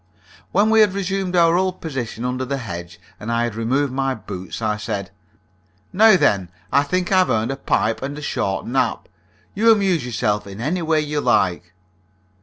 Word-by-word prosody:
When 210 +3 +3
we 220 - +5
had 205 -3 +4
resumed 195 -1 -2
our 170 -1 +5
old 185 0 0
position 125 -6 -5
under 125 +1 -2
the 135 +2 -2
hedge, 85 -7 -7 0.2
and 110 +2 -5
I 115 0 +1
had 120 -2 -2
removed 130 +5 0
my 135 0 0
boots, 95 -4 -7
I 110 -2 -1
said: 105 -3 -4 0.8
"Now, 215 +1 +6
then, 100 - +2 0.2
I 140 - +4
think 180 +6 -1
I've 185 -1 +4
earned 110 +3 0
a - - -2
pipe 115 -4 0
and 140 +2 -5
a - - -7
short 95 -8 -2
nap. 125 -1 -1 0.5
You 225 +3 +3
amuse 195 - +2
yourself 105 -4 -1
in 100 +1 -9
any 155 +9 -1
way 160 -1 +1
you 150 0 -2
like." 90 -7 +1
135 Hz, 185 wpm, -21 LUFS, 110-175 Hz, 0.8 s, Now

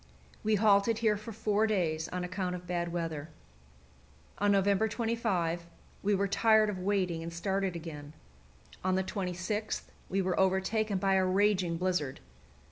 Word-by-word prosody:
We 215 0 +3
halted 210 +1 +4
here 220 -2 +2
for 215 +2 -7
four 215 0 +1
days 165 -6 0
on 180 0 -3
account 180 0 -2
of 180 0 -8
bad 175 -1 -2
weather. 165 -3 -3 1.1
On 205 0 +3
November 200 +2 +3
25 195 -7 -1 0.3
we 205 +1 +2
were 200 +1 +1
tired 220 +1 +4
of 190 - -6
waiting, 185 -3 0
and 165 +1 -5
started 190 +2 -1
again. 155 -3 -7 0.7
On 185 0 +2
the 190 - +1
26th 190 +3 -3 0.3
we 195 - 0
were 185 -1 0
overtaken 190 +2 +1
by 195 +1 +2
a 190 0 +4
raging 185 -2 +2
blizzard. 175 -7 -1
190 Hz, 150 wpm, -31 LUFS, 175-205 Hz, 1.1 s, halted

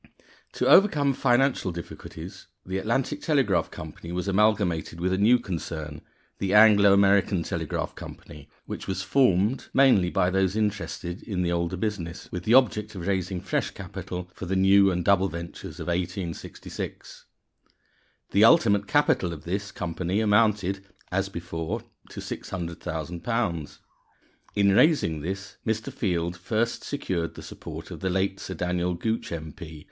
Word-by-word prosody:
_ - - -40
To - - -1
overcome 150 -9 +5
financial 125 -6 +2
difficulties, 85 0 -9 0.2
the 95 +1 -2
Atlantic 135 +7 -1
Telegraph 135 - +2
Company 80 +2 -9
was 90 +2 -3
amalgamated 100 -5 +1
with 90 +2 0
a - - +1
new 115 +5 +6
concern, 80 -8 -5 0.4
the 100 +1 0
Anglo 105 -2 +7
American 100 -2 +4
Telegraph - - -3
Company, 75 -1 -11 0.2
which - - -6
was 95 - -2
formed, 115 -2 +2
mainly 125 -10 +5
by 90 -1 +1
those 95 0 +1
interested 100 -4 -2
in 95 -5 -2
the 85 - 0
older 85 +1 -1
business, 90 -4 -4
with 90 0 -5
the 110 - +3
object 110 -4 +3
of 90 -2 -6
raising 95 -2 -1
fresh 95 - -1
capital 90 0 -7
for 95 - -7
the 95 - -1
new 95 +1 +5
and 90 -2 -1
double 95 -1 +4
ventures 85 +1 -8
of 80 - -5
1866. 90 0 -5 1.1
The 100 - +4
ultimate 105 -7 +5
capital 145 - +2
of 80 -3 -8
this 100 +3 -3
company 90 +3 -2
amounted 105 -3 +2 0.3
(as 95 +1 0
before) 85 -3 -4 0.3
to - - -8
£600,000. 85 +1 -4 0.8
In 100 -1 +4
raising 100 - +3
this, 95 +5 -5
Mr. 110 0 -2
Field 85 -3 -1
first 110 +6 -1
secured 90 - -3
the - - -9
support - - -9
of - - -7
the 95 - -1
late 95 +1 0
Sir 95 - -6
Daniel 90 +1 -1
Gooch, 110 +6 -2
M.P. 80 0 -7
95 Hz, 145 wpm, -26 LUFS, 85-105 Hz, 1.1 s, Anglo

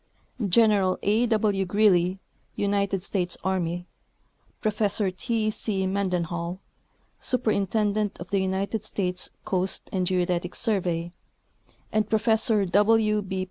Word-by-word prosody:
General 200 -2 +3
A. 220 +4 +2
W. 210 -3 +1
Greely, 185 -2 +3 0.4
United 200 -2 0
States 180 -3 -2
Army, 175 -2 -1 0.7
Professor 210 -2 0
T. 215 +3 -1
C. 195 -3 -1
Mendenhall, 180 -2 -2 0.6
Superintendent 210 -3 0
of 175 - -9
the 200 -1 +2
United 195 +3 -1
States 180 -4 -2 0.2
Coast 185 0 -1
and 185 -2 0
Geodetic 180 -1 0
Survey, 175 -5 -1 0.8
and 215 -1 0
Professor 220 -1 +3
W. 210 +3 +3
B. 190 -1 -4
195 Hz, 105 wpm, -26 LUFS, 180-215 Hz, 0.8 s, General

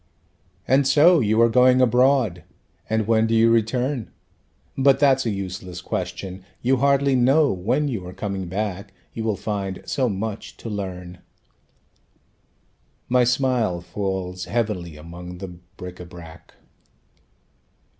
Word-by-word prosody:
"And 135 +1 +3
so 155 +5 +6
you 110 -2 +2
are - - +6
going 125 +2 +5
abroad; 125 -6 +3 0.5
and 110 0 +1
when 110 0 +3
do 115 - +1
you 115 +1 +5
return? 120 +2 0 0.7
But 135 0 +4
that's 135 -3 +3
a - - +2
useless 95 -3 -5
question. 95 +1 -5 0.2
You 130 +2 +3
hardly 140 +1 +3
know 135 +4 +4
when 120 +11 0
you 105 -10 -4
are - - -7
coming 95 -1 -4
back, 100 +1 -4 0.2
You 115 - -4
will 110 -2 0
find 100 -3 -4
so 130 -3 0
much 105 +1 -5
to 115 - -7
learn." 90 -3 -6 1.9
My 125 0 +4
smile 125 -7 +1
falls 90 0 -4
heavily 100 -9 -2
among 90 +3 -9
the 95 +1 -7 0.3
bric 90 0 -8
├Ā 90 -1 -10
brac. 85 -2 -13
110 Hz, 135 wpm, -23 LUFS, 90-125 Hz, 1.9 s, so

